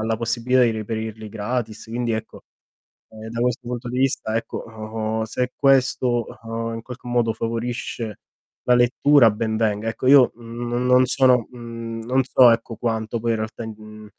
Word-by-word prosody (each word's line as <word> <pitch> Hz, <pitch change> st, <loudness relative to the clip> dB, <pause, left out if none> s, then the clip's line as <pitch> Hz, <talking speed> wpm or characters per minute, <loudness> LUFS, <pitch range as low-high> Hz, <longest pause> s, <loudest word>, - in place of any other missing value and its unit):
alla 110 Hz, +1 st, 0 dB
possibilità 120 Hz, +2 st, +1 dB
di 120 Hz, -, +4 dB
reperirli 110 Hz, 0 st, -5 dB
gratis, 110 Hz, +1 st, -4 dB
quindi 115 Hz, +1 st, -2 dB
ecco 110 Hz, -, -6 dB, 0.7 s
ehm, 110 Hz, 0 st, -10 dB
da 115 Hz, +1 st, -4 dB
questo 125 Hz, 0 st, -1 dB
punto 120 Hz, 0 st, -4 dB
di 125 Hz, -, -3 dB
vista 130 Hz, -4 st, 0 dB
ecco 115 Hz, -, -5 dB
o 110 Hz, 0 st, -4 dB
se 125 Hz, +3 st, -2 dB
questo, 130 Hz, -3 st, +2 dB, 0.2 s
uhm, 115 Hz, 0 st, -4 dB
in 115 Hz, -, -6 dB
qualche 125 Hz, 0 st, -10 dB
modo 120 Hz, -2 st, +1 dB
favorisce 115 Hz, -1 st, -4 dB, 0.4 s
la 125 Hz, -, +4 dB
lettura 125 Hz, +1 st, +5 dB
ben 110 Hz, +1 st, -2 dB
venga. 110 Hz, 0 st, 0 dB
Ecco, 130 Hz, +3 st, -3 dB
io 135 Hz, -2 st, +7 dB
no 120 Hz, +1 st, -5 dB
non 125 Hz, +1 st, +4 dB
sono, 125 Hz, -2 st, +3 dB
mhmm, 115 Hz, -1 st, -7 dB
non 130 Hz, +2 st, +2 dB
so 125 Hz, -1 st, +6 dB
ecco 115 Hz, -1 st, 0 dB
quanto 110 Hz, 0 st, -2 dB
poi 115 Hz, +1 st, 0 dB
in 115 Hz, -, +1 dB
realtà 110 Hz, +1 st, -5 dB
i -, -, -6 dB
mhmm, 110 Hz, 0 st, -11 dB
115 Hz, 175 wpm, -22 LUFS, 110-125 Hz, 0.7 s, io